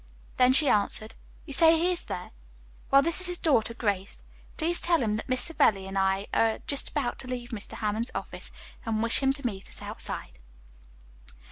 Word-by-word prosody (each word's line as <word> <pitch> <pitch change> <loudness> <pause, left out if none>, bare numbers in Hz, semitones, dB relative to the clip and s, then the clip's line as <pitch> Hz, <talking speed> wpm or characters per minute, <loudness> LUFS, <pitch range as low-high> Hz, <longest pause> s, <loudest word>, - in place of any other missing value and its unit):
Then 250 0 +6
she 280 +3 +5
answered, 215 0 +1 0.3
"You 285 - -5
say 325 +3 +6
he 350 +3 +2
is 355 - -3
there? 180 - -6 0.6
Well, 275 0 +6
this 335 +3 -1
is 370 - -4
his 355 0 -2
daughter, 230 -9 +2
Grace. 200 -4 -2 0.3
Please 340 +2 0
tell 335 -5 +3
him 210 -2 0
that 220 - -7
Miss 255 0 +3
Savelli 245 -12 +2
and 195 0 -7
I 195 +1 +1
are 225 -1 +3
just 280 - 0
about 280 -5 -2
to 260 - -6
leave 245 -1 -5
Mr. 220 -4 -6
Hammond's 215 +3 -2
office, - - -6 0.3
and 225 -2 -1
wish 230 - +3
him 270 -1 +3
to 275 -1 -8
meet 195 -5 -4
us - - -8
outside." - - -6
245 Hz, 195 wpm, -28 LUFS, 210-295 Hz, 0.6 s, Then